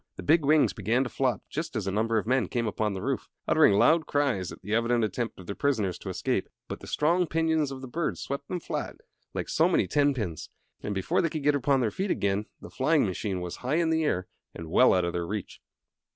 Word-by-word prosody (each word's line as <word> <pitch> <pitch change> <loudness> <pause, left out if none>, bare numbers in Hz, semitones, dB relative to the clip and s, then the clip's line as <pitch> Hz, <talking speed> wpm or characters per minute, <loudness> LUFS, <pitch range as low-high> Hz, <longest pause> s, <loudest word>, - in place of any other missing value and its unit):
The - - -8
big 160 +1 +4
wings 150 +1 +4
began 115 +4 +1
to 125 - -5
flop 130 -2 0
just 155 -2 -5
as 110 -4 -2
a 95 - -1
number 110 +3 +1
of 110 - 0
men 125 +1 +1
came 120 -2 -1
upon 105 -1 -1
the 95 - -5
roof, - - -2 0.2
uttering - - +5
loud 160 +10 +4
cries 135 -11 0
at - - -10
the 105 +3 -4
evident 115 +1 +2
attempt 110 +2 -3
of 95 - -10
their 100 - -4
prisoners 110 -9 0
to - - -7
escape. - - -1 0.2
But - - -6
the - - -11
strong 170 +4 +2
pinions 160 -2 +1
of 135 -1 -7
the 130 - -7
bird 155 +5 -2
swept 140 +1 -5
them 180 - -3
flat, - - -4 0.4
like - - -2
so - - +3
many - - +2
ten 145 +8 +2
pins, 90 - -4 0.3
and 105 - -3
before 95 - +1
they 165 - +1
could 155 -2 -4
get 145 +1 +4
upon 140 -1 +2
their 110 -3 +1
feet 190 - -3
again 100 - 0
the - - -11
flying 150 +2 +2
machine 95 -1 -3
was 90 -1 -5
high 130 +4 -1
in 165 -1 +2
the 160 0 +2
air 90 -11 0 0.3
and 80 -1 -8
well 130 +4 +6
out 90 -1 +2
of 85 - -2
their 85 -1 -2
reach. 105 -1 -5
125 Hz, 245 wpm, -28 LUFS, 100-145 Hz, 0.4 s, well